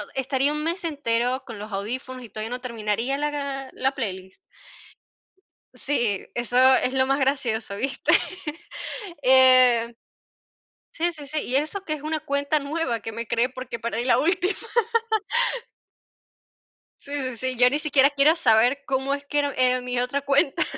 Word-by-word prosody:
estaría 270 +2 +1
un 300 0 -3
mes 340 +2 -2
entero 255 -4 -1
con 230 -4 -9
los 210 +1 -8
audífonos 250 +6 -5
y 230 - -11
todavía 215 +2 -5
no 250 0 -5
terminaría 230 +2 -2
la 280 -2 -4
la 265 +1 -1
playlist. 190 -6 -5 1.4
Sí, 235 -9 -1
eso 240 +1 0 0.2
es 255 - 0
lo 260 0 +2
más 275 +1 0
gracioso, 235 -6 0
¿viste? 265 +6 0 1.1
Eh, 255 -2 +5 1.0
sí, 340 +1 0
sí, 295 -3 -9
sí, 305 +2 -2
y 255 - +1
eso 310 +7 0
que 310 - -1
es 295 - -9
una 310 0 -2
cuenta 285 0 0
nueva, 280 -5 -3
que 225 - -6
me 230 +1 -5
creé 235 +2 +1
porque 255 -2 -7
perdí 235 +1 -3
la 255 - +3
última. 360 +4 +2 2.5
Sí, 285 - -10
sí, 255 -3 -3
sí, 260 +1 -1
yo 250 0 +6
ni 290 - 0
siquiera 290 -2 +4
quiero 290 +3 +4
saber 245 +1 +3
cómo 270 +1 -1
es 285 0 -4
que 290 - -3
era, 285 -1 -1
eh, 255 0 +3
mi 250 0 -2
otra 250 +3 -1
cuenta. 280 +1 +2
260 Hz, 160 wpm, -24 LUFS, 240-285 Hz, 2.5 s, yo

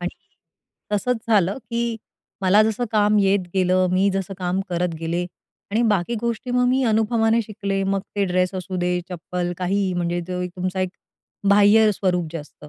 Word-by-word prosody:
आणि 175 0 -2 0.8
तसंच 245 +4 +1
झालं, 205 0 +2
की 235 -1 -3 0.5
मला 200 +3 +5
जसं 220 +2 0
काम 210 0 +3
येत 195 0 +3
गेलं, 185 0 +3
मी 190 +2 +3
जसं 195 0 -3
काम 185 +1 -1
करत 175 -1 -1
गेले 170 +2 -2 0.4
आणि 225 +3 +1
बाकी 205 +2 +1
गोष्टी 235 +2 -3
मग 250 0 +2
मी 260 +1 +2
अनुभवाने 225 +1 +2
शिकले. 200 -2 -3
मग 195 0 0 0.2
ते 200 - +2
ड्रेस 185 0 0
असू 185 0 -4
दे, 180 0 0
चप्पल 175 0 -4
काही 190 +1 0
म्हणजे 175 0 -1
जो 180 0 -3
तुमचा 185 +1 -2
एक 185 -1 -1 0.6
बाह्य 205 +2 +6
स्वरूप 180 -3 0
जे 165 - -3
असतं. 150 0 -13
195 Hz, 170 wpm, -22 LUFS, 180-215 Hz, 0.8 s, बाह्य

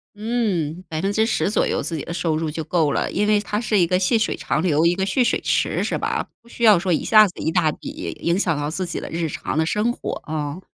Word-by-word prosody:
嗯， 205 -7 -2
10% 200 +7 0
左 - - +1
右 - - -1
自 165 - -4
己 - - -5
的 170 - -6
收 165 -2 0
入 160 -1 -2
就 160 +1 -4
够 155 -2 +1
了， - - -1
因 205 - 0
为 210 -1 +4
它 210 0 -2
是 215 -3 +1
一 175 - +3
个 180 - +2
细 185 +5 +1
水 220 - 0
长 155 - -1
流， 165 -2 +2
一 170 - +4
个 190 +1 -2
蓄 245 +6 +2
水 - - 0
池 - - 0
是 - - -1
吧？ - - -2
不 235 - -25
需 235 - -7
要 215 -4 +7
说 180 +1 0
一 - - 0
下 215 -1 +7
子 180 - -10
一 160 - 0
大 160 -3 +2
笔， 290 - -7
影 170 +2 +1
响 175 -5 +1
到 145 0 -2
自 185 +4 -3
己 - - -4
的 - - -7
日 165 0 -2
常 150 - -4
的 160 - +2
生 210 +7 +1
活 - - -5
啊， 150 +1 -4
180 Hz, 280 characters per minute, -22 LUFS, 160-210 Hz, -, 要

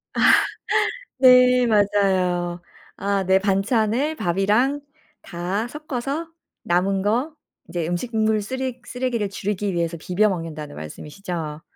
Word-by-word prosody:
아. - - -1 1.0
네 250 -1 +6
맞아요. 185 -4 +1 0.3
아 200 0 -1
네. 190 +1 +4
반찬을 220 +8 +1
밥이랑 215 - +1 0.4
다 190 +5 -3
섞어서 300 +3 -4 0.3
남은 190 +2 +1
거 245 +10 0 0.3
이제 170 -2 -3
음식물 220 +3 0
쓰레 260 +3 -4
쓰레기를 245 -5 -2
줄이기 200 -1 -2
"위해서 170 0 -1
비벼 190 +6 +1
먹는다."는 155 -5 -5
말씀이시죠? 155 - -6
200 Hz, 245 characters per minute, -22 LUFS, 180-245 Hz, 1.0 s, 네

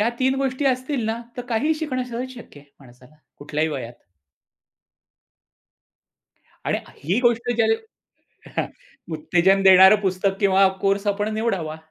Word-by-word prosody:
या 215 - +3
3 260 0 +2
गोष्टी 270 +1 -1
असतील 260 -1 -1
ना 225 +1 -2 0.2
तर 245 - -4
काहीही 285 +8 +1
शिकणं 295 -5 -3
सहज 250 +1 -5
शक्य 225 - -13
आहे 145 - -24
माणसाला. 125 +2 -19 0.2
कुठल्याही 150 +2 -2
वयात? 130 -6 -5 2.7
आणि - - 0 0.3
ही 180 +9 +1
गोष्ट 240 -1 +1
ज्याने 225 -1 +3 1.4
उत्तेजन 180 +5 +2
देणारं 190 +1 +8
पुस्तक 195 0 -1
किंवा 195 -1 +4 0.2
कोर्स 200 +1 +1
आपण 205 +1 -1
निवडावा. 195 -9 -2
205 Hz, 125 wpm, -22 LUFS, 180-245 Hz, 2.7 s, देणारं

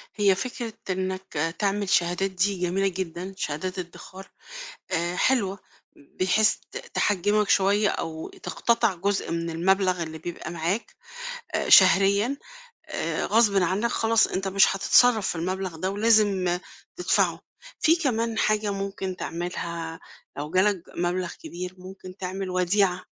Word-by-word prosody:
هي 200 -3 +3
فكرة 235 +2 -5 0.2
إنك، 185 -2 -3
آآ، 165 +3 0
تعمل 200 +2 -1
شهادات 180 +3 +1
دي 190 +2 +1
جميلة 180 +2 0
جدًا، 185 0 -5
شهادات 185 +3 -3
إدّخار، 185 +2 -10 0.6
آآ، 175 +2 -1
حلوة، 200 -4 +1 0.4
ب 140 - -23
بحيث 215 +4 +4 0.2
ت - - -9 0.2
تحجّمك 205 +1 +1
شوية 200 +2 +3
أو 160 -3 -4
تقتطِع 230 -3 0
جزء 195 +3 -1
من 170 0 -2
المبلَغ 185 +2 +1
اللي 160 -1 -6
بيبقى 170 0 -7
معاك، 170 +6 -3 0.6
آآ، - - -1
شهريًا، 200 +6 +6 0.5
آآ، - - -2
غصبٍ 210 -3 +3
عنك 195 +7 0
خلاص 225 -1 +3
أنت 195 +1 -3
مش 195 0 +4
هتتصرّف 220 +1 +4
في - - -1
المبلَغ 185 +1 -3
ده 185 +4 -2
ولازم 200 -4 +3 0.4
تدفَعه. - - +1 0.4
فيه 325 +2 +4
كمان 230 -7 -1
حاجة 215 -1 +1
ممكن 195 -1 -4
تعملها 170 -1 -5 0.4
لو 145 +1 -5
جالك 185 +1 +2
مبلَغ 175 0 -1
كبير، 180 +1 -6
ممكن 185 0 -11
تعمل 190 0 -4
وديعة 185 0 +1
190 Hz, 135 wpm, -25 LUFS, 175-205 Hz, 0.6 s, شهريًا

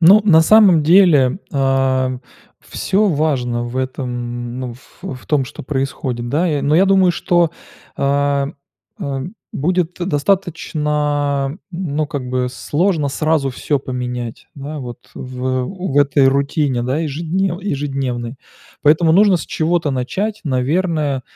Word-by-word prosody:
Ну, 190 +6 +8
на 160 -6 +6
самом 190 -3 +6
деле, 160 -5 +5
а, 135 -2 +1 0.4
всё 200 +3 0
важно 135 -7 0
в 120 +1 -6
этом, 120 -2 -4
ну, 125 - -4
ф 125 - -19
в 170 -9 -7
том, 145 -3 +1
что - - -9
происходит, 130 -3 -3
да? 155 +8 +1
Я, 150 -5 0
но 145 +2 +2
я 185 +4 +5
думаю, 190 -2 +4
что, 175 -1 +2 0.5
а, 140 0 +1 0.5
а, 135 -1 -3 0.3
будет 180 +3 0
достаточно 150 -5 0
н 165 +8 -10 0.4
ну, 155 0 +1
как 140 -4 -5
бы 125 0 -1
сложно 150 +4 0
сразу 155 0 0
всё 145 +3 -1
поменять, 125 -3 -5
да, 145 +1 -6
вот, 120 -2 -9
в, 125 0 -7
э, 130 0 0
у 190 +3 -5
в 145 - +4
этой 140 -1 +4
рутине, 140 -1 0
да, 130 +5 -1
ежеднев 170 +4 -2
ежедневной. 135 - -3 0.5
Поэтому 160 +2 +4
нужно 195 0 +5
с - - -7
чего-то 165 -1 0
начать. 195 - -2
Наверное, 145 0 0
145 Hz, 140 wpm, -18 LUFS, 130-165 Hz, 0.5 s, Ну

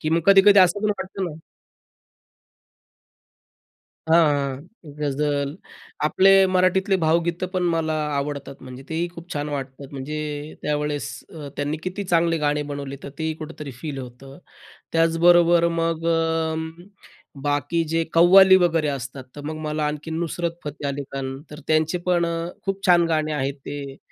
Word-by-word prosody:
की 155 - -2
मग 165 +1 +3
कधी-कधी 200 +1 +7
असं 185 +2 +4
पण 210 - +2
वाटतं 190 0 -4
ना 160 -2 -7 2.7
हां, 160 - +6 0.2
हां. 145 - -5
गझल, 145 0 -1 0.5
आपले 185 +5 +4 0.2
मराठीतले 185 +1 +2
भावगीतं 170 +2 +1
पण 185 - 0
मला 160 -1 0 0.2
आवडतात, 140 -1 -4
म्हणजे 130 0 -10
तेही 165 +2 -1
खूप 170 0 -10
छान 145 0 -3
वाटतात. 135 -1 -6
म्हणजे 150 +2 -5
त्यावेळेस 150 -1 -2 0.3
अ, 150 -3 -7
त्यांनी 145 +2 -2
किती 185 +2 -4
चांगले 170 -2 +2
गाणे 150 0 0
बनवले, 140 -1 -5
तर - - -7
तेही 160 -1 -2
कुठेतरी 155 -2 -8
फील 145 -2 -5
होतं. 135 +3 -10 0.5
त्याचबरोबर 170 +1 +4
मग 165 -1 -1
अं, 160 -1 0 0.7
बाकी 145 +3 0
जे 165 +1 +1
कव्वाली 190 +3 +7
वगैरे 165 -4 +2
असतात, 130 -1 -5
तर 145 - -6
मग 155 +1 -4
मला 150 0 -1
आणखी 150 +2 -4
नुसरत 170 +1 -2
फतेह 145 -1 -4
अली 140 +1 -3
खान, 135 0 -4
तर 150 +1 -9
त्यांचे 160 +2 +2
पण 175 -1 +2
अ, 165 0 -3 0.2
खूप 195 0 -3
छान 175 -2 +6
गाणे 155 -1 0
आहेत 135 -1 -1
ते. 140 -2 -6
160 Hz, 145 wpm, -23 LUFS, 145-170 Hz, 2.7 s, कधी-कधी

